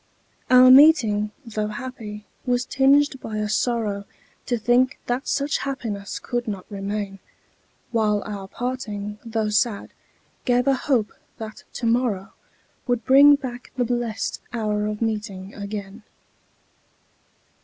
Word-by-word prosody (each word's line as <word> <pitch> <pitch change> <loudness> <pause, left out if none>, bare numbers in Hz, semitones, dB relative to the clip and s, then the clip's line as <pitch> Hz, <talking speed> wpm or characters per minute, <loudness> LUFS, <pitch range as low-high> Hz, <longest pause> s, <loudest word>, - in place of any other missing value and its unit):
Our 255 0 +8
meeting, 250 -8 +6 0.2
tho' 215 -2 -2
happy, 215 -2 -7 0.2
was 250 -1 0
tinged 275 +1 +3
by 215 -1 -5
a 210 0 -1
sorrow 215 -2 -1 0.4
To 240 - +1
think 245 +3 +2
that 245 +3 -2
such 280 +1 0
happiness 225 -8 -4
could 240 -1 -3
not 195 -4 -4
remain; 200 0 -4 0.7
While 215 -3 +1
our 200 -2 -6
parting, 210 -4 -4
tho' 225 -2 -1
sad, 210 0 0 0.5
gave 245 0 +2
a 275 - +4
hope 255 -5 0 0.2
that 220 -1 -8
to - - -4
morrow 230 -5 0 0.5
Would 245 -2 0
bring 280 +2 +8
back 250 -3 -7
the 245 - +2
blest 240 -2 -2
hour 210 -3 -1
of 210 +1 -3
meeting 210 -3 -4
again. 200 +1 -7
225 Hz, 125 wpm, -23 LUFS, 210-250 Hz, 0.7 s, Our